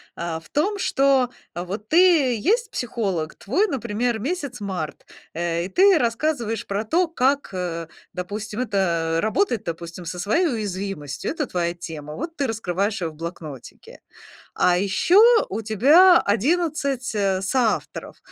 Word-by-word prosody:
А, 170 -1 -4
в 160 -1 -20
том, 400 +8 0
что, 275 -7 +2 0.3
а, 175 - -3
вот 205 +4 -6
ты 325 -7 +5
есть 445 - +1
психолог, 195 -10 -2
твой, 340 - 0
например, 235 - -2
месяц 280 - -4
март, 185 -6 -5 0.3
э, 170 0 -1
и - - -6
ты 385 - +5
рассказываешь 235 -3 -1
про 200 +2 -2
то, 340 +11 +1
как, 280 -3 +1
э, 170 -3 -4 0.3
допустим, 210 +5 -5
это 170 -8 0
работать, 235 - 0
допустим, 170 +1 -6
со 175 +2 -5
своей 220 - +2
уязвимостью. 195 - -4
Это 300 -3 -3
твоя 170 -1 -1
тема. 155 -3 -8
Вот 330 +4 -6
ты 285 - -1
раскрываешь 200 -2 -2
её 165 - -1
в 155 - -17
блокнотике. 160 -5 -9 0.5
А 175 -1 +3
ещё 200 - +3 0.3
у 215 +4 -3
тебя 290 - +6
11, 280 - 0
э, 195 -3 0
соавторов, 235 +2 -1
215 Hz, 145 wpm, -23 LUFS, 175-275 Hz, 0.5 s, тебя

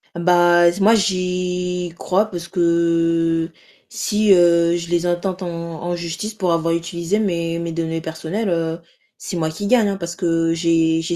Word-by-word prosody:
Bah 175 0 +4
z 180 - -8
moi 215 +3 +5
j'y 180 -3 -1
crois 190 +5 +1
parce 170 -2 -6
que 165 -1 +1 0.4
si, 215 -2 0
heu, 170 -1 +4
je 170 -1 -7
les 175 0 0
intente 175 +2 -2
en - - -4 0.4
en 175 0 -2
justice 170 +6 -5
pour 185 -5 0
avoir 165 0 0
utilisé 170 +3 -2
mes 170 -5 -1
mes 170 0 -4
données 165 0 -3
personnelles, 165 +7 -4
heu, 165 -1 -1 0.4
c'est - - -6
moi 160 -1 -1
qui 200 +6 -5
gagne, 235 -3 +4
hein. 195 - -2
Parce 170 -2 -6
que 165 -2 0
j'ai 165 -1 +2
j'ai 170 +1 -3
170 Hz, 170 wpm, -20 LUFS, 165-180 Hz, 0.4 s, moi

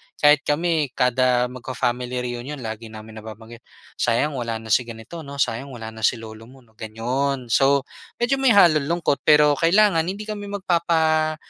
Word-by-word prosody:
kahit 150 -1 +4
kami 160 -1 0
kada 125 -1 +2
magfa-family 125 0 -3
reunion 120 +4 -5
lagi 110 0 -6
namin 110 0 -11
nababanggit, 110 +2 -11 0.4
sayang 120 +6 +1
wala 115 -1 -3
na 110 - -7
si - - +4
ganito 115 +9 -9
'no, 140 -1 -9
sayang 135 +1 -1
wala 110 -2 -8
na 110 - -11
si - - 0
lolo 110 0 -11
mo, 130 0 -17
'no, 110 - -28
ganun. 120 +4 -3
So 135 0 +3 0.3
medyo 245 +3 0
may 265 - +4
halong 155 -7 +5
lungkot 170 -4 0
pero 150 -1 +6
kailangan 180 +1 +4
hindi 200 +3 -4
kami 210 -1 -6
magpapa 165 -5 +1
135 Hz, 165 wpm, -22 LUFS, 115-155 Hz, 0.4 s, pero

